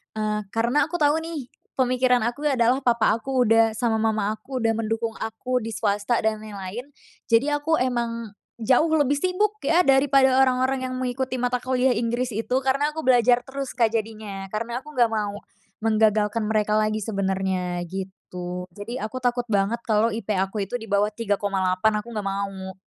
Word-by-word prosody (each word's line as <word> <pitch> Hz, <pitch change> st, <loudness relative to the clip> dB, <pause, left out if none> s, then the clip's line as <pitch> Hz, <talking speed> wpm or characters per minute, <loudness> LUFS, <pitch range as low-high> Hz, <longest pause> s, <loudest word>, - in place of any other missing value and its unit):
eee, 215 Hz, -1 st, -1 dB, 0.2 s
karena 235 Hz, +7 st, +2 dB
aku 350 Hz, -, -6 dB
tau 300 Hz, -1 st, +3 dB
nih 320 Hz, -6 st, -6 dB, 0.3 s
pemikiran 255 Hz, -1 st, +2 dB
aku 245 Hz, +6 st, -3 dB
adalah 255 Hz, -2 st, +3 dB
papa 235 Hz, -2 st, +3 dB
aku 260 Hz, +1 st, 0 dB
udah 225 Hz, -1 st, +4 dB
sama 225 Hz, -1 st, +1 dB
mama 215 Hz, -2 st, +1 dB
aku 255 Hz, +3 st, -5 dB
udah 225 Hz, 0 st, +2 dB
mendukung 225 Hz, 0 st, -2 dB
aku 250 Hz, +3 st, -2 dB
di 225 Hz, -1 st, -5 dB
swasta 205 Hz, +3 st, 0 dB
dan 220 Hz, -1 st, +1 dB
yang 215 Hz, -1 st, -9 dB
lain. 220 Hz, +8 st, -6 dB, 0.4 s
Jadi 230 Hz, +5 st, +3 dB
aku 290 Hz, +2 st, +1 dB
emang 235 Hz, -3 st, -2 dB, 0.3 s
jauh 255 Hz, +7 st, +4 dB
lebih 290 Hz, -1 st, +2 dB
sibuk 385 Hz, +6 st, 0 dB
ya 335 Hz, +5 st, +4 dB
dari 270 Hz, -2 st, +4 dB
pada 265 Hz, -1 st, +4 dB
orang-orang 260 Hz, 0 st, +2 dB
yang 255 Hz, -, -5 dB
mengikuti 255 Hz, 0 st, -2 dB
mata 250 Hz, 0 st, +1 dB
kuliah 255 Hz, +1 st, +1 dB
Inggris 240 Hz, +1 st, -1 dB
itu, 225 Hz, +4 st, -3 dB
karena 275 Hz, +3 st, +1 dB
aku 315 Hz, -, -4 dB
belajar 245 Hz, -1 st, +4 dB
terus, 270 Hz, +1 st, -6 dB
Kak, 230 Hz, -3 st, +2 dB
jadinya. 215 Hz, -3 st, -4 dB
Karena 230 Hz, +3 st, -2 dB
aku 300 Hz, +3 st, -13 dB
nggak 240 Hz, -4 st, +3 dB
mau, 210 Hz, -2 st, -2 dB, 0.5 s
menggagalkan 215 Hz, 0 st, +2 dB
mereka 215 Hz, 0 st, +1 dB
lagi 215 Hz, 0 st, 0 dB
sebenarnya 190 Hz, -3 st, -1 dB
gitu. 180 Hz, -1 st, -6 dB
Jadi 205 Hz, +7 st, -7 dB
aku 215 Hz, +4 st, -4 dB
takut 245 Hz, -1 st, 0 dB
banget 205 Hz, +4 st, +1 dB
kalau 220 Hz, 0 st, +2 dB
IP 215 Hz, -1 st, -4 dB
aku 195 Hz, +2 st, -1 dB
itu 245 Hz, -, -2 dB
dibawah 210 Hz, -1 st, +1 dB
3,8 205 Hz, -2 st, 0 dB
aku 210 Hz, -, -10 dB
nggak 210 Hz, -2 st, -3 dB
mau. 195 Hz, -1 st, -4 dB
230 Hz, 175 wpm, -24 LUFS, 210-255 Hz, 0.5 s, udah